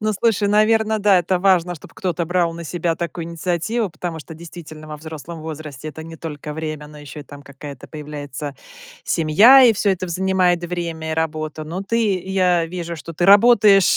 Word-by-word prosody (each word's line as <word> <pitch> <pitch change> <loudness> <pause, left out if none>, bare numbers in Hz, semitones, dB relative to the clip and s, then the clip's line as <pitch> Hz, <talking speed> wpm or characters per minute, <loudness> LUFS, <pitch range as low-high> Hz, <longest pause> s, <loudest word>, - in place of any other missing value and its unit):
Ну 215 0 0
слушай, 210 -1 +1
наверно, 220 +1 +3
да, 200 -2 +4
это 180 +1 0
важно, 180 -2 +2
чтоб 155 - -14
кто-то 175 -2 -2
брал 175 -1 +1
на 170 0 -8
себя 165 0 -1
такую 170 0 -4
инициативу. 175 +7 -2
Потому 165 0 -5
что, 160 +1 -10
действительно, 160 -2 -11
во 150 - -6
взрослом 160 +1 -9
возрасте 155 -2 -7
это 155 +1 -8
не 165 0 -10
только 150 -2 -7
время, 155 -1 -5
но 150 0 -13
еще 145 0 -9
и - - -8
там 145 +1 -12
какая-то 140 -1 -11
появляется 145 -2 -7 0.5
семья. 205 - +6
И 235 -3 +7
всё 205 0 +1
это 185 -1 -2
в 175 - -7
занимает 180 -1 +1
время, 170 -2 -4
и - - -1
работа. 155 -1 -3
Но 170 +5 -5
ты, 215 -2 0
я 180 -3 +1
вижу, 170 -1 -5
что 160 +2 -9
ты 175 - 0
работаешь 205 -2 +6
170 Hz, 195 wpm, -20 LUFS, 155-190 Hz, 0.5 s, И